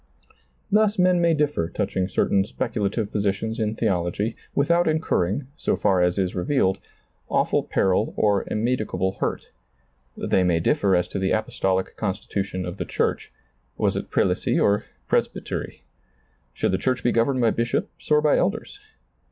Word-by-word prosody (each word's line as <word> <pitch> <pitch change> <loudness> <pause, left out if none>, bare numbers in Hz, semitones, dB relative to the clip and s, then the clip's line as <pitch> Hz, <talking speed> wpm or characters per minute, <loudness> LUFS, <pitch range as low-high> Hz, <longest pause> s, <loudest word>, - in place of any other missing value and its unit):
Thus 215 0 +3
men 180 -1 +4
may 170 -1 +3
differ 145 - 0
touching 95 0 -2
certain 95 +1 +2
speculative 105 -1 -2
positions 105 +3 -1
in 110 0 -1
theology 100 +1 -1 0.2
without 170 +5 +3
incur 155 - +1
ring, 125 +9 -3
so - - 0
far 95 -3 +2
as 90 +1 +2
is 95 -2 0
revealed, 95 -1 +1 0.5
awful - - +2
peril 95 +3 0
or 100 -2 +2
immed 120 +4 0
icable 95 -2 -2
hurt. - - -3 0.7
They 95 - +1
may 85 -2 +2
differ 95 +3 +2
as 90 0 +1
to 100 - -3
the 95 0 0
apostolic 95 -3 -1
constitution 95 -2 -3
of 90 +2 -6
the - - -3
church - - -1 0.2
— - - -43
was - - +1
it - - -4
prelacy - - +1
or 100 0 +2 0.2
pres - - +2
bytery? - - -6 0.7
Should - - -1
the 95 - 0
church 130 -1 -1
be 120 - +3
governed 125 +3 +1
by 115 -2 +4
bishops 115 +1 -3
or 150 0 +5
by 150 - +4
elders 225 - -2
105 Hz, 160 wpm, -24 LUFS, 95-135 Hz, 0.7 s, or